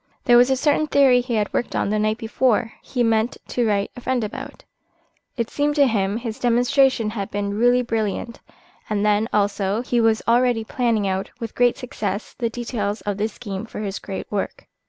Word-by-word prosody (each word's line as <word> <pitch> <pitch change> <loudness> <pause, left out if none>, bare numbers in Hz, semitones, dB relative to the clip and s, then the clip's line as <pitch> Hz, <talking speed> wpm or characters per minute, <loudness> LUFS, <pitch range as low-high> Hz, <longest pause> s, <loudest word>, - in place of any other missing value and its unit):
There 240 - +5
was 245 +2 +6
a 265 - +3
certain 300 +2 +2
theory 265 -4 +5
he 245 -1 -3
had 210 -2 -1
worked 240 - -2
on 200 - 0
the 215 - +1
night 215 +1 +1
before 230 0 0
he 245 -2 -1
meant 225 +1 +1
to 240 -2 0
write 200 -1 0
to - - -9
a - - -13
friend 255 -1 0
about. 210 - -7 0.7
It 235 -2 -2
seemed 290 0 0
to 285 -2 +5
him 205 -4 0
his 230 -2 -5
demonstration 245 -1 +2
had 200 -3 -4
been 200 0 -2
really 245 +3 +3
brilliant, 225 0 -2 0.5
and 210 -1 0
then, 210 +1 +2
also, 205 +1 0
he 245 -1 +1
was 225 -1 +2
already 240 -1 +3
planning 225 -3 0
out 190 0 -2
with 230 -2 -5
great 245 -1 +2
success 210 -6 -4
the 235 -2 0
details 225 -3 -3
of 205 -1 -3
the 210 +1 0
scheme 215 -1 -7
for 210 - -7
his 200 -2 -4
great 195 - -6
work. 210 - -3
225 Hz, 200 wpm, -22 LUFS, 210-245 Hz, 0.7 s, was